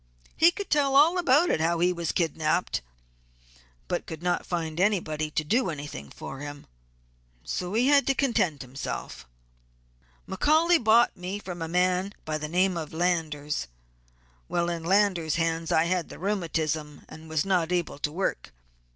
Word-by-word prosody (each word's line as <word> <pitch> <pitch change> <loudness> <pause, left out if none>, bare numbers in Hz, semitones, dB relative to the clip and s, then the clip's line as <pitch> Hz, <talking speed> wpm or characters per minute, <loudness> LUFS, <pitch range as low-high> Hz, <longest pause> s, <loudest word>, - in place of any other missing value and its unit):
He 330 - +6
could 395 +2 -6
tell 280 -3 +3
all 325 +6 +6
about 300 - +3
how 165 +2 +1
he 180 +2 +2
was 170 -2 -2
kidnapped, 160 - 0 1.1
but - - -3
could 160 +1 -7
not 180 0 0
find 165 -2 -3
anybody 165 -6 0
to 155 - -1
do 230 - +1
anything 145 - -7
for 135 - -8
him, 145 0 -8 0.8
so 180 +3 -3
he 240 +3 +3
had 285 -1 +4
to 275 - +2
content 190 - +1
himself. 125 - -6 1.0
"McCaully 315 - +3
bought 225 +2 +5
me 185 +3 -5
from 180 -4 -7
a 165 - -2
man 180 +3 +1
by 155 0 -2
the 150 0 -5
name 180 +2 +2
of 160 -2 -6
Landers. 160 - -1 0.8
While 175 0 0
in 170 -1 -4
Landers' 185 -4 +2
hands 165 -1 -1
I 160 - +4
had 175 0 -1
the - - -9
rheumatism 160 -6 -2
and 160 0 -12
was 160 0 0
not 180 -3 +1
able 175 -5 -1
to 150 - -2
work. 170 - -2
175 Hz, 160 wpm, -27 LUFS, 155-200 Hz, 1.1 s, He